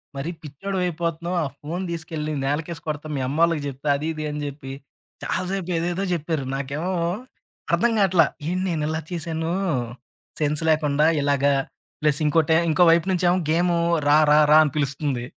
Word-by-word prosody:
"మరి 140 +4 -3
పిచ్చోడివయిపోతన్నావు. 170 +1 -3
ఆ - - -1
ఫోను 170 +5 -4
దీసుకెళ్ళి 160 -2 -4
నేలకేసి 160 +4 -2
కొడతా, 150 0 -4
మీయమ్మోళ్ళకి 150 +4 +1
జెప్తా" 140 +2 -4
అది, 150 +3 -4
ఇది 155 -1 -5
అని 150 0 -4
జెప్పి, 135 -1 -7 0.5
చాలాసేపు 185 0 -2
ఏదేదో 175 +3 -1
జెప్పారు. 160 -4 -2
నాకేమో 140 +6 -3 0.8
అర్థంగాటల్లా. 190 -3 +3 0.2
ఏంటి 180 +2 -1
నేనిలా 155 -1 -1
చేశానూ 165 -1 -3 0.9
సెన్స్ 150 +1 0
లేకుండా 150 -1 +2 0.2
ఇలాగ, 140 -1 +1 0.6
ప్లస్ 150 -2 +2
ఇంకోటే 160 +1 +3
ఇంకో 160 +3 +4
వైపు 165 -1 +3
నుంచేమో 180 0 +2
గేమూ 175 +1 +2 0.3
రా, 145 +1 +6
రా, 150 - +6
రా 155 - +8
అని 150 - -1
పిలుస్తుంది. 140 -3 -1
160 Hz, 135 wpm, -23 LUFS, 145-170 Hz, 0.9 s, రా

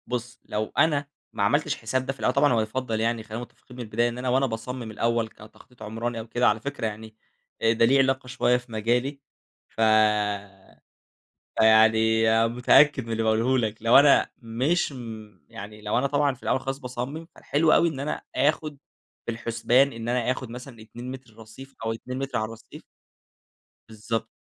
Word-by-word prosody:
بُص 120 -1 -5
لو 110 +1 -3
أنا 145 -3 +2 0.3
ما 105 -3 -1
عملتش 145 +7 +1
حساب 130 +3 -2
ده 135 - -2
في 135 - -22
الأول 125 - +1
طبعًا 140 0 +3
هو 115 - +2
يُفضّل 110 0 -3
يعني 115 0 0
خلّينا 110 +2 -6
متفقين 125 +1 -13
من 125 - -5
البداية 115 +2 0
إن 120 - -7
أنا 125 0 -2
وأنا 135 +2 +3
باصمم 120 0 -5
الأول 115 +1 0
كتخطيط 110 +3 -16
عمراني 115 +2 -4
أو 110 - -7
كده، 120 +2 +1
على 105 - +2
فكرة 140 -2 -3
يعني 110 0 -8 0.5
آآ 115 0 +3
ده 115 - +3
ليه 135 +4 +4
علاقة 135 -1 +1
شوية 125 -1 +2
في 125 -1 -13
مجالي 120 +6 -1 0.6
ف - - -3 1.8
فيعني 110 0 +5 0.2
متأكد 125 +3 +4
من 115 - -6
اللي 115 0 -1
باقوله 115 +4 +2
لك، 110 -3 -2
لو 115 +1 +6
أنا 140 0 +5
مش 130 +9 -1
م 110 -6 -9
يعني 105 +1 -10
لو 105 0 -1
أنا 135 +3 +2
طبعًا 145 0 +1
في 130 - -17
الأول - - +1
خالص 135 +1 -4
باصمم 130 +4 -6
فالحلو 155 +2 +1
أوي 170 - +4
إن 145 -4 -7
أنا 145 +2 -3
آخُد 150 +2 0 0.5
في - - -2
الحُسبان 120 +3 +1
إن 115 0 -5
أنا 125 0 +1
آخُد 130 -1 -5
مثلًا 125 -1 -10
2 120 +3 -9
متر 130 -4 -11
رصيف 115 +5 -13
أو 115 - 0
2 125 +3 -7
متر 135 -1 -3
على 110 - 0
الرّصيف. 115 0 -12 1.1
بالضبط 115 +1 -4
120 Hz, 185 wpm, -25 LUFS, 110-130 Hz, 1.8 s, لو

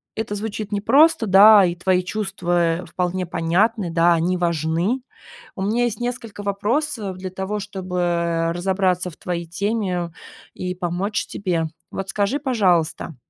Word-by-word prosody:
это 220 -2 -3
звучит 210 0 -5
непросто, 270 +8 +4
да, 200 +1 +8
и 175 - -1
твои 180 +1 +1
чувства, 175 -4 -1
э, - - -11
вполне 180 0 -2
понятны, 175 +4 +1
да, 170 +1 +4
они 175 +2 +1
важны. 170 - 0 0.5
У 190 - -4
меня 230 +5 +1
есть 225 -2 -3
несколько 235 -4 -5
вопросов 210 0 -1
для 185 0 -6
того, 190 +2 -3
чтобы 175 -4 -1
разобраться 185 0 0
в - - -17
твоей 170 -1 -4
теме 180 -1 -2 0.4
и 180 0 -4
помочь 180 +3 -2
тебе. 175 -5 -1 0.2
Вот 195 0 -5
скажи, 205 +9 0
пожалуйста, 180 - +1
190 Hz, 140 wpm, -22 LUFS, 175-210 Hz, 0.5 s, да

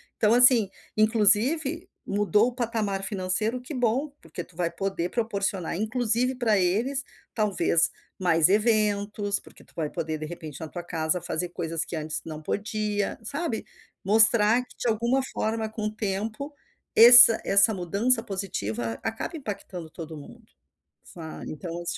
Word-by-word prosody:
Então, 215 0 +2
assim, 245 -4 +6 0.3
inclusive 240 - +2 0.2
mudou 210 +2 +2
o 250 - -5
patamar 220 -5 -2
financeiro, 205 +5 -2
que 255 +4 -9
bom, 250 +4 0
porque 165 +2 -8
tu 165 - -22
vai 170 -1 -1
poder 190 -3 -3
proporcionar 200 -7 -2
inclusive 240 +3 0
pra 225 -4 +1
eles 230 +9 0 0.3
talvez 190 -6 +1 0.3
mais 170 -2 +4
eventos, 205 -1 +1
porque - - -18
tu - - -25
vai 155 -2 -2
poder 155 0 -4
de 155 - -6
repente 155 -3 -9
na 160 - -5
tua 175 +2 -7
casa 165 0 -1
fazer 175 +2 -3
coisas 165 -2 -3
que 170 - -6
antes 155 0 -4
não 155 -1 -7
podia, 210 +3 -2
sabe. 280 -1 -4 0.4
Mostrar 220 +2 +4
que - - -19
de - - -3
alguma 235 +4 +1
forma 220 0 -2
com 215 -1 -5
o 215 - -6
tempo, 215 +7 -4 0.4
esse 240 +1 +10
essa 200 +3 +5
mudança 205 +7 0
positiva 120 - -4
acaba 225 +9 -4
impactando 195 - -7
todo 160 -1 -9
mundo, 230 +11 -13 0.6
sa 160 -2 -10
então 170 +2 -6
210 Hz, 145 wpm, -26 LUFS, 175-230 Hz, 0.6 s, esse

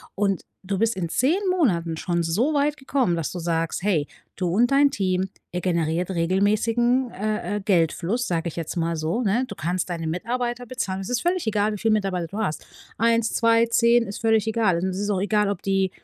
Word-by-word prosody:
Und 195 -1 0 0.2
du 195 +1 -2
bist 225 +2 +1
in 170 -3 -3
10 285 - +2
Monaten 175 - +1
schon 170 0 -1
so 210 - +1
weit 295 +1 +1
gekommen, 265 -9 0
dass 165 -4 -3
du 180 - -5
sagst: 165 0 -1
„Hey, 170 -8 +1 0.3
du 180 - -2
und 230 +7 +3
dein 280 0 +5
Team, 185 -5 0 0.2
ihr 180 0 -3
generiert 170 0 0
regelmäßigen, 215 +8 +1
äh, 210 -1 -2
äh, - - -5
Geldfluss“, 190 +5 +1
sage 170 -1 -1
ich - - -11
jetzt 165 -2 -4
mal 165 0 0
so, 160 +10 -1
ne, 230 +6 +1
du 205 - -7
kannst 175 +3 -2
deine 165 -2 -3
Mitarbeiter 240 +7 -2
bezahlen. 195 -7 -3
Es 195 - -6
ist 245 -1 0
völlig 350 -7 0
egal, 210 0 +1
wie - - -4
viele 225 -1 +2
Mitarbeiter 190 -5 -1
du 200 +5 -8
hast. 195 -8 -2 0.3
1, 230 0 +2
2, 230 0 +4
10, 235 +1 +4
ist 200 - -7
völlig 225 -1 +3
egal. 220 -6 +2
Es 190 +1 -2
ist 205 0 -2
auch 195 -3 +1
egal, 210 0 +2
ob 200 -3 -3
die 195 -1 +1
200 Hz, 210 wpm, -24 LUFS, 175-230 Hz, 0.3 s, dein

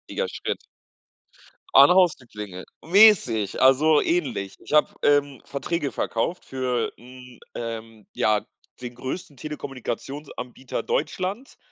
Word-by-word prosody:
wichtiger 485 -1 -2
Schritt. - - -5 1.1
An - - +9
Haustüren 180 -9 +3
klingeln 100 -4 -8 0.2
Mäßig, 170 - +5
also 145 +4 +5
ähnlich. 125 - -1
Ich - - -9
hab, 150 - +3
ähm, 145 -2 +2
Verträge 145 +1 -3
verkauft 165 +10 -2
für 125 -3 -2
'n, 125 0 -14 0.2
ähm 115 -2 -7
ja, 105 -1 +1 0.4
den 120 -1 -7
größten 135 +3 -6
Telekommunikationsanbieter 135 -2 -6
Deutschlands, 185 - -3
130 Hz, 110 wpm, -24 LUFS, 115-155 Hz, 1.1 s, An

